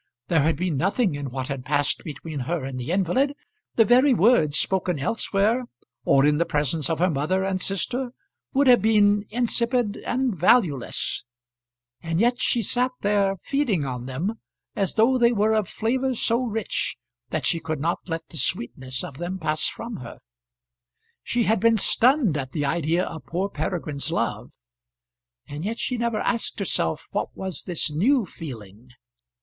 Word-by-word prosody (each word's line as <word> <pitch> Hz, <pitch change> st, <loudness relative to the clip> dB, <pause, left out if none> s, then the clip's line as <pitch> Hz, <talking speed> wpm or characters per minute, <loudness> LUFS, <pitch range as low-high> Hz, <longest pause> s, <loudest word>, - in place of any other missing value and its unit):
There 165 Hz, -3 st, +4 dB
had 160 Hz, +3 st, +2 dB
been 175 Hz, -4 st, -1 dB
nothing 195 Hz, -, +1 dB
in 145 Hz, -1 st, -4 dB
what 130 Hz, 0 st, -4 dB
had 140 Hz, -3 st, -4 dB
passed 145 Hz, +1 st, 0 dB
between 155 Hz, -1 st, -6 dB
her 145 Hz, +2 st, -2 dB
and 130 Hz, -1 st, -5 dB
the 125 Hz, +6 st, -4 dB
invalid. 200 Hz, -, +1 dB, 0.4 s
The 225 Hz, -, +5 dB
very 255 Hz, +4 st, +5 dB
words, 170 Hz, -, +4 dB
spoken 180 Hz, 0 st, 0 dB
elsewhere, 215 Hz, -, +1 dB, 0.4 s
or 135 Hz, 0 st, +5 dB
in 150 Hz, 0 st, +3 dB
the -, -, +4 dB
presence 150 Hz, +2 st, 0 dB
of 165 Hz, -, 0 dB
her 180 Hz, +2 st, +2 dB
mother 155 Hz, +7 st, 0 dB
and 190 Hz, -1 st, -1 dB
sister, 245 Hz, +8 st, -1 dB, 0.4 s
would 280 Hz, +1 st, +3 dB
have 245 Hz, -5 st, +6 dB
been 205 Hz, -1 st, +4 dB
insipid 235 Hz, -1 st, +1 dB
and 250 Hz, -3 st, -1 dB
valueless; 175 Hz, -, +2 dB, 0.8 s
and 165 Hz, 0 st, -2 dB
yet 240 Hz, +3 st, +2 dB
she 235 Hz, -, +1 dB
sat 250 Hz, +5 st, +1 dB
there 200 Hz, -1 st, +2 dB
feeding 240 Hz, -, 0 dB
on 125 Hz, -1 st, -5 dB
them 175 Hz, -, -3 dB, 0.4 s
as 195 Hz, -3 st, 0 dB
though 245 Hz, +4 st, +4 dB
they 235 Hz, 0 st, +5 dB
were 220 Hz, -1 st, +2 dB
of 215 Hz, -3 st, 0 dB
flavour 255 Hz, +3 st, -1 dB
so 230 Hz, +1 st, +2 dB
rich 225 Hz, -1 st, -2 dB, 0.3 s
that -, -, -2 dB
she 170 Hz, -, +2 dB
could 155 Hz, -2 st, -4 dB
not 165 Hz, +4 st, 0 dB
let 165 Hz, -1 st, -4 dB
the 165 Hz, -, -10 dB
sweetness 130 Hz, 0 st, -2 dB
of 150 Hz, -7 st, -8 dB
them 175 Hz, +2 st, -3 dB
pass 155 Hz, -3 st, -1 dB
from 230 Hz, 0 st, -6 dB
her. 120 Hz, -2 st, -9 dB, 1.0 s
She 240 Hz, 0 st, 0 dB
had 220 Hz, -1 st, +2 dB
been 230 Hz, +2 st, +4 dB
stunned 235 Hz, -, +3 dB
at 135 Hz, -2 st, -5 dB
the 145 Hz, -3 st, -1 dB
idea 165 Hz, +3 st, +1 dB
of 160 Hz, -, -8 dB
poor 185 Hz, +4 st, -1 dB
Peregrine's 155 Hz, -8 st, -3 dB
love, -, -, -2 dB, 1.0 s
and 145 Hz, +2 st, -6 dB
yet 220 Hz, +4 st, -2 dB
she 250 Hz, -, -2 dB
never 235 Hz, -2 st, -1 dB
asked 235 Hz, -1 st, -1 dB
herself 155 Hz, -, -1 dB
what -, -, -1 dB
was 190 Hz, -3 st, -5 dB
this 170 Hz, -3 st, -1 dB
new 225 Hz, -, +2 dB
feeling. 120 Hz, -, -10 dB
185 Hz, 170 wpm, -24 LUFS, 150-230 Hz, 1.0 s, have